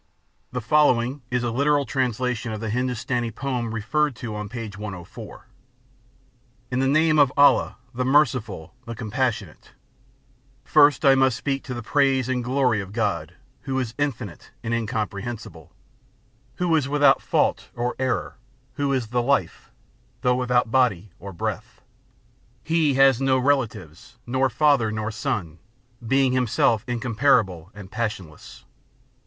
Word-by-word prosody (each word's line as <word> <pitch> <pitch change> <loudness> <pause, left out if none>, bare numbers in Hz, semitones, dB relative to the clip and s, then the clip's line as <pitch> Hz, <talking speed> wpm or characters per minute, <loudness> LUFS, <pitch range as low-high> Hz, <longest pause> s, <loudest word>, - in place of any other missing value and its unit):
The 125 0 -3
following, 135 -1 +2
is 125 -1 -1
a 120 - -1
literal 140 +3 +2
translation 125 -3 -1
of 110 - -4
the 110 -1 -4
Hindustani 125 0 -1
poem 120 0 -3
referred 140 +6 0
to 110 -2 -6
on 105 -1 -5
p. 115 0 -5
104: 100 -4 -9 1.3
IN 125 - 0
THE 135 - +2
NAME 155 +2 +3
OF 140 -3 +5
ALLAH, 145 0 +5 0.2
THE 125 +1 -2
MERCIFUL, 125 - +1
THE 115 - -5
COMPASSIONATE: 110 - -3 0.9
First 145 +3 +4
must - - 0 0.2
I 135 - +5
speak 135 +4 -3
to 125 - -5
the 120 - -6
praise 135 0 +2
and 130 -1 -1
glory 125 -4 +1
of 95 0 -9
God, 105 -3 -2 0.3
who 135 -1 -3
is 125 -4 -2
infinite 120 - -4
and 115 - -2
incomprehensible, 110 0 -4 0.8
Who 175 -2 +1
is 140 -4 0
without 145 0 +4
fault - - 0
or 120 +1 -2
error, 130 -3 -2 0.4
who 140 -1 0
is 125 -5 -1
the 120 +1 +1
Life, 120 -8 -1 0.5
though 125 - +3
without 125 -2 +1
body 110 -7 +1
or 100 - -8
breath. 85 - -5 0.8
He 160 -3 +1
has 135 -2 +5
no 135 -1 +3
relatives, 120 - -2
nor 130 +2 +1
father 130 -3 +2
nor 110 0 -3
son, 90 -6 -3 0.4
being 135 +2 +2
himself 115 -3 +2
incomparable 115 - +1
and 100 -2 -11
passionless. 105 -9 -6
125 Hz, 140 wpm, -24 LUFS, 110-135 Hz, 1.3 s, OF